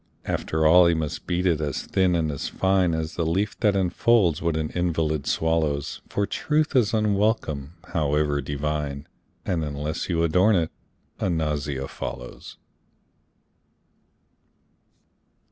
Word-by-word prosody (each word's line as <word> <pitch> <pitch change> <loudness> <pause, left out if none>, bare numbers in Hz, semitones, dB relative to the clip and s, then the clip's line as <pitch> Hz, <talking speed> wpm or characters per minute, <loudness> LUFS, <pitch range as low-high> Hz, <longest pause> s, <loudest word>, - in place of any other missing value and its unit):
After 80 0 -1
all 85 +2 +7
he 85 - +3
must 80 -2 -4
beat 90 +1 0
it 85 -4 +2
as 75 -3 -2
thin 95 -2 +1
and 80 -2 0
as 70 - -4
fine 95 -3 +2
As 80 0 -3
the 85 - -1
leaf 95 +6 0
that 105 -3 +3
enfolds 95 -1 +2
what 85 -2 0
an 80 -1 -2
invalid 80 -4 -1
swallows, 80 -3 0
For 100 - 0
truth 155 +6 0
is 120 -5 +4
unwelcome, 100 - 0 0.2
however 75 -2 +1
divine, 75 0 -3 0.4
And 85 -3 -1
unless 75 +3 -4
you 85 -2 +1
adorn 90 +6 +4
it, 80 -3 0 0.5
a - - 0
nausea 75 -4 -2
follows. 60 0 -8
80 Hz, 130 wpm, -24 LUFS, 75-90 Hz, 0.5 s, all